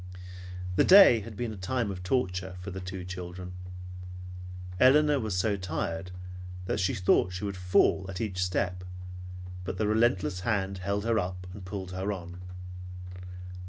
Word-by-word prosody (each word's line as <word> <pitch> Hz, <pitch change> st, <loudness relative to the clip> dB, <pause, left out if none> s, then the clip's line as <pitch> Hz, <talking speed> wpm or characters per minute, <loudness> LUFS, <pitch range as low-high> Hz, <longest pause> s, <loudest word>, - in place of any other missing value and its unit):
The -, -, +7 dB
day 190 Hz, -, +9 dB
had 105 Hz, 0 st, -8 dB
been 120 Hz, -1 st, -2 dB
a -, -, -7 dB
time 105 Hz, +3 st, -1 dB
of 95 Hz, -2 st, -5 dB
torture 90 Hz, -3 st, 0 dB
for 90 Hz, +2 st, -6 dB
the 95 Hz, -, -4 dB
two 95 Hz, 0 st, -5 dB
children. 90 Hz, 0 st, -6 dB, 1.3 s
Elinor 145 Hz, +2 st, +6 dB
was 110 Hz, -6 st, -1 dB
so 100 Hz, +2 st, +2 dB
tired 85 Hz, -1 st, -2 dB, 0.6 s
that 95 Hz, -, 0 dB
she 95 Hz, -, +2 dB
thought 90 Hz, 0 st, +4 dB
that 90 Hz, -, -8 dB
she 90 Hz, -, -4 dB
would 100 Hz, -1 st, -2 dB
fall 90 Hz, +1 st, +3 dB
at 95 Hz, 0 st, -4 dB
each 95 Hz, -5 st, 0 dB
step, 90 Hz, 0 st, 0 dB, 0.8 s
but -, -, -3 dB
the 110 Hz, -, +1 dB
relentless 105 Hz, -4 st, +3 dB
hand 95 Hz, -2 st, 0 dB
held 100 Hz, +2 st, -1 dB
her 115 Hz, -1 st, +3 dB
up 90 Hz, -1 st, -3 dB
and 100 Hz, -1 st, -8 dB
pulled 95 Hz, -1 st, -5 dB
her 95 Hz, +2 st, -1 dB
on. 90 Hz, -2 st, -6 dB
95 Hz, 160 wpm, -30 LUFS, 90-105 Hz, 1.3 s, day